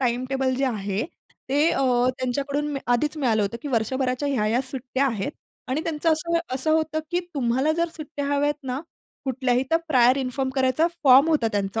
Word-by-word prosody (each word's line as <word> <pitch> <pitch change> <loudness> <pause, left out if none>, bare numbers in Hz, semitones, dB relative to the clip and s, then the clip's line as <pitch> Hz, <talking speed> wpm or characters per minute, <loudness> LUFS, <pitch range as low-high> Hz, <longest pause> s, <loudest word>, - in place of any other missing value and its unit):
timetable 260 +1 0
जे 270 +2 0
आहे 205 -3 -2 0.4
ते 290 +4 +3
अ, - - 0 0.4
त्यांच्याकडून 280 +3 -1
मी 275 - -3
आधी 245 +5 +2
मिळालं 235 -7 +1
होतं, 205 +3 -2
की 290 - -4
वर्षभराच्या 255 +3 0
ह्या-ह्या 235 -3 +1
सुट्ट्या 265 +1 -1
आहेत 230 +2 -2 0.4
आणि 265 +4 0
त्यांचं 325 0 +1
असं 335 +2 0 0.2
असं 265 +4 -1
होतं, 315 0 +1
की 350 - +1
तुम्हाला 265 +3 +1
जर 335 +1 0
सुट्ट्या 295 -2 -5
हव्या 280 0 0
आहेत 290 +1 +2
ना 255 +1 -2 0.4
कुठल्याही, 255 -1 +1
तर 325 - +5
प्रायर 255 -3 +5
इन्फॉर्म 265 0 -2
करायचा, 265 +4 +2 0.2
फॉर्म 270 +3 +7
होता 300 -8 +2
त्यांचा 200 +1 -1
265 Hz, 180 wpm, -24 LUFS, 245-290 Hz, 0.4 s, फॉर्म